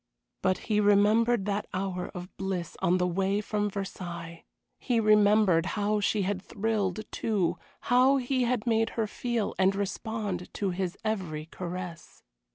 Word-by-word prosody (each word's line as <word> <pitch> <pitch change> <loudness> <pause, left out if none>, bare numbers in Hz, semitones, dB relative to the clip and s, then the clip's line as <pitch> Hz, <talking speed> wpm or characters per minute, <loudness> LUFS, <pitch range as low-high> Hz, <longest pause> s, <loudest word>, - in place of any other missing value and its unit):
But 185 -1 +2
he 210 -2 +2
remembered 210 +2 +4
that 205 0 -1
hour 185 -1 -2
of 180 +1 -8
bliss 190 -4 -3
on 180 +2 +3
the 180 - +1
way 195 +3 +1
from 210 0 -1
Versailles; 175 -4 -6 0.3
he 245 -3 +1
remembered 210 -5 +4
how 210 +1 +1
she 205 0 +1
had 190 0 -1
thrilled, 210 -2 -1
too, 180 -6 0 0.2
how 255 +3 +4
he 260 0 0
had 240 -2 0
made 225 -1 +2
her 225 - +2
feel 235 0 -2
and 190 +1 +4
respond 200 -1 -3
to 195 -2 -1
his 180 +1 -3
every 175 -8 -2
caress. 175 0 -7
200 Hz, 150 wpm, -28 LUFS, 180-215 Hz, 0.3 s, remembered